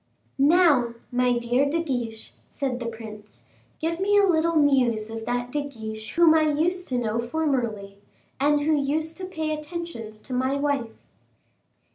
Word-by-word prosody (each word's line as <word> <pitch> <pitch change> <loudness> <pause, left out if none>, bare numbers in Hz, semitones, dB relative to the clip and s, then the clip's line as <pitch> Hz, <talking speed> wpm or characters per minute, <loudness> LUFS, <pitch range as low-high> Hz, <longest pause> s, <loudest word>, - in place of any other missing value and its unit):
"Now, 285 -6 +4 0.2
my 250 0 +2
dear 245 +4 +1
De 330 +3 0
Guiche," 240 -7 -4 0.2
said 265 -3 -3
the 240 - -4
prince, 220 -2 -10 0.4
"give 330 +2 -2
me 410 +2 +3
a 405 - +6
little 335 -2 +2
news 250 -7 +2
of 225 0 -6
that 245 0 -2
De 295 - 0
Guiche 220 -6 -7
whom 335 -1 +6
I 320 - +4
used 355 +5 0
to 255 - -1
know 230 -1 -1
formerly, 235 -7 -2 0.4
and 290 +1 +3
who 310 +2 +2
used 305 +3 0
to 370 - -5
pay 320 -4 -3
attentions 305 -8 -6
to 260 - -8
my 260 +2 +1
wife." 280 -5 -1
275 Hz, 160 wpm, -25 LUFS, 235-315 Hz, 0.4 s, a